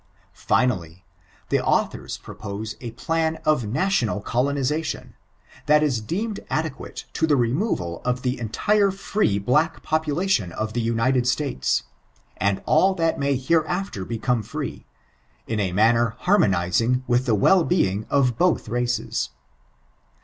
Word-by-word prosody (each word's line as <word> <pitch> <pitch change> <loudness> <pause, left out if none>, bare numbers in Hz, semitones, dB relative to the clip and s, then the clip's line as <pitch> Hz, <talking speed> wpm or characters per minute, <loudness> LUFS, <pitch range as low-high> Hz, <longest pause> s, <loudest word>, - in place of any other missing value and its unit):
Finally, 90 -8 0 0.4
the - - +1
authors - - 0
propose 105 +1 -7
a 120 - -5
plan 160 -1 -1
of 150 -8 +2
national 130 - 0
colonization, 140 +7 -1 0.5
that 150 0 +5
ia 130 -7 +1
deemed 200 - -3
adequate 155 -3 -4
to 160 - +1
the 150 - +4
removal 120 - -1
of 125 0 -1
the 125 0 -1
entire 200 - +2
free 195 - 0
black 150 +11 +1
population 155 - 0
of 110 0 -3
the 120 - 0
United 115 +2 +1
Btatea, 125 - 0 0.5
and 100 0 0
all 190 +5 +4
that 165 -4 0
may 140 0 +1
hereafter 160 - 0
become 115 +3 -1
free, - - -6 0.6
in 110 -1 -2
a 95 -3 0
manner 115 +4 +3
haimooizing 115 - +2
with 125 +1 +1
the 115 - +3
well'being 110 - +2
of 125 -4 +2
both 180 -8 +2
races. 120 +2 -1
125 Hz, 125 wpm, -23 LUFS, 110-160 Hz, 0.6 s, that